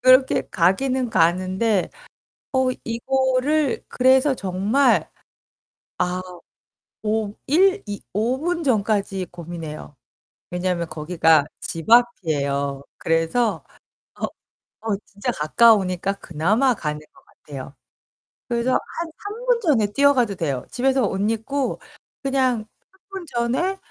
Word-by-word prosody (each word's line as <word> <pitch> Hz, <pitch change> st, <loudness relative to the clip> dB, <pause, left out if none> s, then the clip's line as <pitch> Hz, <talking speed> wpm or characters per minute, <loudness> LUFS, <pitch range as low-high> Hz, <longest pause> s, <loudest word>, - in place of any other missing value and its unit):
그렇게 255 Hz, +1 st, +5 dB
가기는 250 Hz, +8 st, +1 dB
가는데 185 Hz, +3 st, +2 dB, 0.6 s
어 260 Hz, -1 st, +2 dB
이거를 260 Hz, +4 st, 0 dB
그래서 260 Hz, +2 st, +4 dB
정말 200 Hz, +7 st, +2 dB, 0.9 s
아 180 Hz, +1 st, 0 dB, 0.8 s
오 215 Hz, -1 st, 0 dB
일 380 Hz, +7 st, +3 dB
이 205 Hz, -1 st, -6 dB
5 230 Hz, +6 st, 0 dB
분 340 Hz, 0 st, -1 dB
전까지 200 Hz, -6 st, 0 dB
고민해요. 165 Hz, -4 st, -8 dB, 0.5 s
왜냐면 180 Hz, -1 st, -1 dB
거기가 160 Hz, -1 st, +3 dB
집 165 Hz, +4 st, -6 dB
앞이에요. 140 Hz, -, +2 dB, 0.2 s
그래서 165 Hz, +8 st, 0 dB, 0.5 s
어 -, -, -2 dB, 0.6 s
어 220 Hz, -3 st, 0 dB
진짜 200 Hz, 0 st, -4 dB
가까우니까 195 Hz, +2 st, +3 dB
그나마 205 Hz, -, +2 dB
가는 150 Hz, -6 st, -3 dB
것 -, -, -22 dB
같아요. 135 Hz, -1 st, -10 dB, 0.7 s
그래서 240 Hz, +1 st, 0 dB
한 335 Hz, -1 st, -3 dB
3 430 Hz, +4 st, -7 dB
분 -, -, +3 dB
전에 265 Hz, -, +3 dB
뛰어가도 265 Hz, -7 st, +3 dB
돼요. 140 Hz, -8 st, -2 dB
집에서 265 Hz, +1 st, +1 dB
옷 195 Hz, -, -3 dB
입고 255 Hz, +5 st, -2 dB, 0.4 s
그냥 260 Hz, -5 st, +1 dB, 0.3 s
3 380 Hz, -, -28 dB
분 385 Hz, -2 st, -7 dB
전에 260 Hz, +10 st, -1 dB
225 Hz, 215 characters per minute, -22 LUFS, 180-265 Hz, 0.9 s, 그렇게